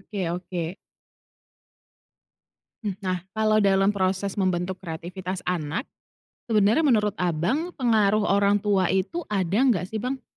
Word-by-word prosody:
Oke 200 +1 -8 0.2
oke. 180 -1 -4 2.1
Mhm. 200 -3 -3
Nah, 185 -1 -1 0.2
kalau 215 0 +3
dalam 195 0 +3
proses 190 0 0
membentuk 185 0 -1
kreativitas 180 +2 -6
anak, 175 - -2 0.6
sebenarnya 220 +7 +3
menurut 210 -6 +2
Abang 180 - -1
pengaruh 215 -5 +3
orang 200 0 +3
tua 195 -4 +2
itu 205 - -1
ada 195 -2 0
nggak 225 -9 +2
sih, 220 - -2
Bang? 255 +3 -3
195 Hz, 120 wpm, -25 LUFS, 185-215 Hz, 2.1 s, kalau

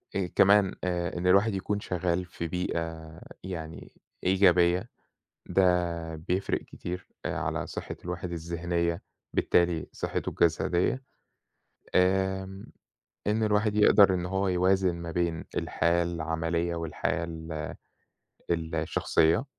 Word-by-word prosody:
آآ، 95 -2 0
كمان 100 -1 +5
آآ، 90 -1 -1
إن 90 +1 -1
الواحد 100 +4 +5
يكون 100 +1 -2
شغال 90 -1 -1
في 85 -1 -5
بيئة 80 -2 -4 0.2
يعني 80 -3 -7 0.3
إيجابية 90 -1 +4 0.6
ده 85 -3 +1
بيفرق 90 +4 -1
كتير 90 +1 -7 0.2
آآ، - - -1
على - - -2
صحة - - -6
الواحد 90 0 -4
الذهنية 85 +1 -2 0.3
بالتالي 85 -2 +2
صحته - - -3
الجسدية. 85 +9 +1 0.9
آمم، 95 +1 +1 0.6
إن 105 +2 +1
الواحد 105 0 +2
يقدر 100 -2 +6
إن 90 -1 -2
هو 95 +1 0
يوازن 95 0 +2
ما 85 -1 -6
بين 85 -1 -1
الحياة 85 +1 +1
العملية 85 0 -1
والحياة 85 +1 -2
ال 80 -2 -6 1.0
الشخصية 80 - +2
90 Hz, 110 wpm, -28 LUFS, 85-95 Hz, 1.0 s, يقدر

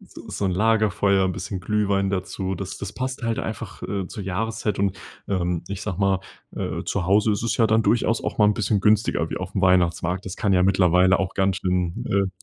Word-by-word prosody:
So - - -13
so 100 - -3
'n - - +1
Lagerfeuer, 100 -1 +2
'n 95 - 0
bisschen 95 +1 -5
Glühwein 100 0 0
dazu. 95 0 -3
Das 95 +2 -6
das 100 0 -6
passt 130 -1 -4
halt 115 -1 -1
einfach, 110 -3 -6
äh, 100 -2 -3
zur 100 - -7
Jahreszeit 105 +2 -2
und, 95 -1 0 0.3
ähm- 90 -3 -1
ich 100 -1 -5
sage 95 -4 -4
mal- 95 -1 +2 0.4
äh, - - -3
zu 95 -3 -1
Hause 105 +4 +3
ist 100 - -2
es 115 - 0
ja 115 - +4
dann 110 +1 +3
durchaus 115 0 +1
auch - - -4
mal 105 - +6
'n 105 - +3
bisschen 105 -2 0
günstiger 105 -5 +2
wie - - -3
auf 95 +1 -6
'm 95 - 0
Weihnachtsmarkt. 90 0 +2
Das 95 - -6
kann 100 - +1
ja 90 -1 +4
mittlerweile 90 0 +4
auch 95 -1 -2
ganz 95 -1 +1
schön, 90 -2 -1
äh 95 -1 -1
95 Hz, 220 wpm, -23 LUFS, 95-105 Hz, 0.4 s, mal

